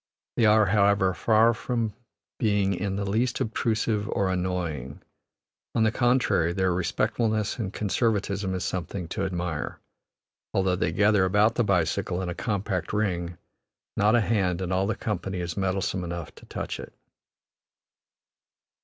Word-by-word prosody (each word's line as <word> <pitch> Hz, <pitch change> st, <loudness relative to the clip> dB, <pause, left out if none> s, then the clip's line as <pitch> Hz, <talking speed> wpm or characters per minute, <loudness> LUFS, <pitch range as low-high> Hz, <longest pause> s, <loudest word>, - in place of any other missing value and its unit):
They 115 Hz, -, +4 dB
are, 105 Hz, 0 st, +6 dB
however, 100 Hz, -1 st, +3 dB
far 115 Hz, +3 st, +4 dB
from 115 Hz, -2 st, -2 dB, 0.5 s
being 100 Hz, -3 st, +2 dB
in 95 Hz, +1 st, -2 dB
the 100 Hz, 0 st, -2 dB
least 120 Hz, +5 st, 0 dB
obtrusive 110 Hz, -1 st, 0 dB
or 95 Hz, -1 st, 0 dB
annoying; 90 Hz, -7 st, -3 dB, 0.8 s
on 115 Hz, -, +3 dB
the 110 Hz, -, +3 dB
contrary, 120 Hz, -9 st, +2 dB
their 95 Hz, -1 st, +1 dB
respectfulness 110 Hz, +5 st, 0 dB
and 100 Hz, -5 st, -2 dB
conservatism 100 Hz, -3 st, 0 dB
is 90 Hz, -, -3 dB
something 90 Hz, 0 st, -3 dB
to 95 Hz, -, -2 dB
admire; 90 Hz, -4 st, -3 dB, 0.8 s
although 95 Hz, -1 st, +2 dB
they 90 Hz, -2 st, 0 dB
gather 105 Hz, +2 st, +3 dB
about 105 Hz, +4 st, +3 dB
the 120 Hz, -, +1 dB
bicycle 90 Hz, -1 st, 0 dB
in 90 Hz, -, -3 dB
a -, -, -2 dB
compact 95 Hz, -1 st, -2 dB
ring, 90 Hz, -5 st, -1 dB, 0.6 s
not 105 Hz, +3 st, +4 dB
a 120 Hz, -, +4 dB
hand 95 Hz, -5 st, +1 dB
in 95 Hz, -1 st, -3 dB
all 95 Hz, +1 st, +1 dB
the 110 Hz, -, 0 dB
company 95 Hz, -4 st, -3 dB
is 85 Hz, -2 st, -3 dB
meddlesome 95 Hz, -1 st, -1 dB
enough 85 Hz, -2 st, -5 dB
to -, -, -16 dB
touch -, -, -4 dB
it. -, -, -9 dB
100 Hz, 145 wpm, -26 LUFS, 90-110 Hz, 0.8 s, are